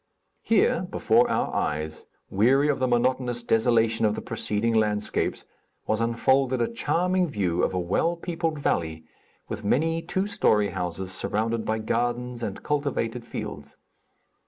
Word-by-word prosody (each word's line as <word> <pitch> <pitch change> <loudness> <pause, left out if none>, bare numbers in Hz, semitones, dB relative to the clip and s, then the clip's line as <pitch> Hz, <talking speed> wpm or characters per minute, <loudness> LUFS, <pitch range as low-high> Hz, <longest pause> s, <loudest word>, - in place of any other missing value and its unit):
Here, - - +2
before - - +3
our - - 0
eyes, 75 +1 -2 0.2
weary 130 +9 +3
of 145 - +1
the 130 - +1
monotonous 120 0 +1
desolation 115 0 +2
of 105 -1 +2
the - - -5
preceding 110 +2 -1
landscapes, 105 -1 0 0.4
was 110 0 0
unfolded 130 +3 +2
a 120 - +2
charming 180 -4 +1
view 90 -8 0
of - - +1
a 90 - -1
well 100 - 0
peopled 165 -2 -2
valley, 80 - -1 0.4
with 105 - -5
many 165 +10 +1
two 190 +3 -1
story 105 - +2
houses 90 0 -4
surrounded 110 +4 -1
by 110 - 0
gardens 120 +2 -2
and 100 -4 -5
cultivated 135 -5 -1
fields. 75 -10 -7
115 Hz, 140 wpm, -26 LUFS, 105-135 Hz, 0.4 s, before